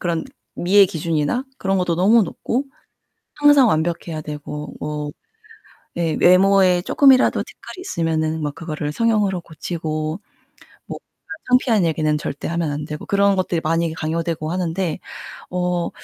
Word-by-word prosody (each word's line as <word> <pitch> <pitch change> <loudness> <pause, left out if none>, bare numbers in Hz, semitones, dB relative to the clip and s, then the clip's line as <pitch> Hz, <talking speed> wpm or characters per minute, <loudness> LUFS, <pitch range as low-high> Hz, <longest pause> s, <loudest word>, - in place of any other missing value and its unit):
그런 170 -2 -1 0.3
미의 195 +3 +5
기준이나 165 - -1
그런 195 0 0
것도 180 -2 0
너무 215 +6 +5
높고 245 - -3 0.7
항상 290 -4 +6
완벽해야 165 -1 -1
되고 150 0 -7
뭐 150 0 -4 0.9
예 165 -2 0
외모에 185 0 +5
쪼끔이라도 270 +4 +4
티끌이 370 - -12
있으면은 160 - -1
막 145 -1 -3
그거를 155 -2 -4
성형으로 210 -5 +1
고치고 155 0 -4 0.7
뭐 - - -6 0.3
그런 - - -7
창피한 235 -6 +3
얘기는 155 -1 +1
절대 140 - -5
하면 170 -2 -1
안되고 150 +1 -6
그런 200 0 +3
것들이 180 -3 0
많이 165 +1 0
강요되고 160 0 -3
하는데 180 -1 -2 0.5
어 180 -1 -1
170 Hz, 310 characters per minute, -20 LUFS, 155-195 Hz, 0.9 s, 항상